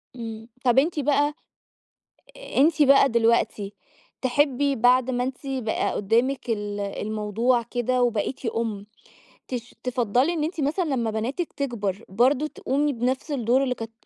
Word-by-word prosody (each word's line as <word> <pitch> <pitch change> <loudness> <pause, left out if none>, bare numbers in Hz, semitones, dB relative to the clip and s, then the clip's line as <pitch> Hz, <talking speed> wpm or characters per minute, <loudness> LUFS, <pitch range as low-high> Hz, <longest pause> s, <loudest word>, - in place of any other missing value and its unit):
إمم 225 -2 -7 0.2
طب 245 +1 +5
أنتِ 310 +3 0
بقى 290 +1 +2 1.2
أنتَ 305 +2 +4
بقى 275 -1 +6
دلوقتي 225 -4 +1 0.5
تحبّي 280 +1 +1
بعد 250 +2 +4
ما 245 -1 0
أنتِ 260 +1 -4
بقى 255 -5 -1
قدّامِك 240 +5 0
ال 205 -2 -2
الموضوع 215 +4 0
كده 245 +2 -1
وبقيتِ 240 +2 -1
أُم، 220 -3 -3 0.6
تش 245 -1 -6
تفضَّلي 250 +4 +1
إن 315 -3 -1
أنتِ 325 0 -3
مثلًا 300 +6 0
لمّا 255 -7 -1
بناتِك 250 +10 -3
تكبر 220 -7 -3
برضه 255 +9 +2
تقومي 290 0 -1
بنفس 255 +4 -2
الدور 255 -1 +2
اللي 255 -2 -1
كانت 225 -1 -7
245 Hz, 135 wpm, -24 LUFS, 225-275 Hz, 1.2 s, بقى